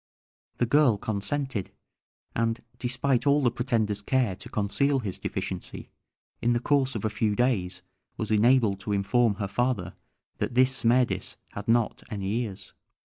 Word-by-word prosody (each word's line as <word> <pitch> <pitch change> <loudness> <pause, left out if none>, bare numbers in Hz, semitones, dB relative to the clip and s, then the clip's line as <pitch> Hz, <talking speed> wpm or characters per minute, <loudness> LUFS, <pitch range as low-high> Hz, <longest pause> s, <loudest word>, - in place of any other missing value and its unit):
The 120 - +2
girl 125 -3 +4
consented, 110 +2 -3 0.7
and, 115 0 0 0.2
despite 125 +1 0
all 140 0 +4
the 120 - +3
pretender's 110 -5 0
care 120 -3 +1
to - - -9
conceal 135 +7 +1
his 105 -8 -4
deficiency, - - -5 0.5
in 120 +1 +3
the 120 - +1
course 135 0 +1
of 110 - -3
a - - +2
few 110 -1 0
days 95 -7 0 0.3
was 110 - -3
enabled 110 -2 +4
to 100 +1 -3
inform 105 +3 +2
her 100 0 -3
father 110 -5 -1 0.5
that - - -2
this 130 +1 +4
Smerdis 125 -1 +1 0.2
had 100 - -7
not 115 -1 +2
any 100 -3 -3
ears. 105 -6 -7
115 Hz, 150 wpm, -27 LUFS, 100-130 Hz, 0.7 s, girl